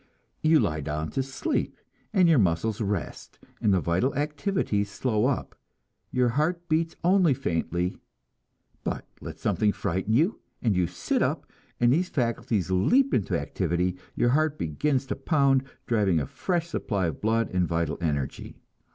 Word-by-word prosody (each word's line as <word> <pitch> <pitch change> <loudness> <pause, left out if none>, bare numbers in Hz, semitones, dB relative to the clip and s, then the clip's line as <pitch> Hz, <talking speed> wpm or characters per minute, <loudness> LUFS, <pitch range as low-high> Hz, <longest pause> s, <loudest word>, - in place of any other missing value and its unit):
You 155 0 +5
lie 75 - 0
down 75 +2 -3
to 135 - 0
sleep, 135 - -2 0.3
and 190 -5 +4
your 160 -5 +5
muscles 100 +4 +1
rest, 100 -4 -4 0.2
and 105 - +3
the 95 - +4
vital 90 +11 0
activities 145 - -1
slow 110 +2 0
up, 140 - -2 0.6
your 125 -1 +2
heart 165 +7 0
beats 165 +1 0
only 180 -5 +4
faintly; 90 -6 -1 0.9
but - - -3
let - - -8
something 105 -1 +1
frighten 95 +2 -2
you, 165 - +2 0.2
and 110 -5 +1
you 90 -1 +2
sit - - -1
up, - - 0 0.3
and 120 +1 +4
these 180 +4 +1
faculties 115 - -1
leap 255 - +3
into 100 - +1
activity, 90 +2 -1 0.2
your 120 - +2
heart 155 +3 +2
begins 130 - 0
to - - -3
pound, 135 -2 +2 0.2
driving 100 -8 +2
a 70 - -2
fresh 170 - -2
supply 100 - -1
of 80 -4 -3
blood 115 +1 +1
and 90 -1 +2
vital 85 -2 -1
energy. 70 -5 -3
115 Hz, 155 wpm, -27 LUFS, 90-150 Hz, 0.9 s, You